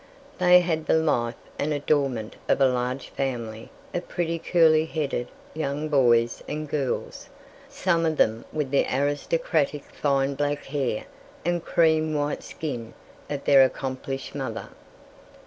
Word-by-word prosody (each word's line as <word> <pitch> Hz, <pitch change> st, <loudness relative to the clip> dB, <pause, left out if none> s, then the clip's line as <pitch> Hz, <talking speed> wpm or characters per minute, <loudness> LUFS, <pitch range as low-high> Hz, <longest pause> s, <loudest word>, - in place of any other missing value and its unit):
They 180 Hz, 0 st, +7 dB
had 160 Hz, -3 st, -1 dB
the -, -, +4 dB
life 125 Hz, -7 st, +1 dB, 0.2 s
and 150 Hz, -, 0 dB
adornment 140 Hz, -6 st, 0 dB
of -, -, +3 dB
a 135 Hz, -, +6 dB
large 125 Hz, +1 st, -1 dB
family 115 Hz, -5 st, -4 dB, 0.2 s
of 175 Hz, -, -3 dB
pretty 170 Hz, -1 st, -2 dB
curly 160 Hz, -2 st, +4 dB
headed 140 Hz, -6 st, -2 dB, 0.3 s
young 150 Hz, 0 st, -2 dB
boys 120 Hz, -5 st, +3 dB
and 155 Hz, +1 st, -4 dB
girls, 140 Hz, -3 st, -3 dB, 0.4 s
some 170 Hz, -3 st, +1 dB
of 155 Hz, -1 st, -1 dB
them 110 Hz, +1 st, +2 dB
with 150 Hz, -4 st, -2 dB
the 140 Hz, -, +3 dB
aristocratic 145 Hz, +2 st, 0 dB
fine 140 Hz, -1 st, 0 dB
black 145 Hz, +1 st, -1 dB
hair 135 Hz, -6 st, -2 dB, 0.4 s
and 175 Hz, -1 st, 0 dB
cream 160 Hz, -1 st, +2 dB
white 145 Hz, 0 st, -1 dB
skin 120 Hz, -8 st, -6 dB, 0.3 s
of 145 Hz, -1 st, -4 dB
their 135 Hz, -2 st, +7 dB
accomplished 135 Hz, 0 st, -3 dB
mother. -, -, -4 dB
145 Hz, 135 wpm, -25 LUFS, 130-155 Hz, 0.4 s, They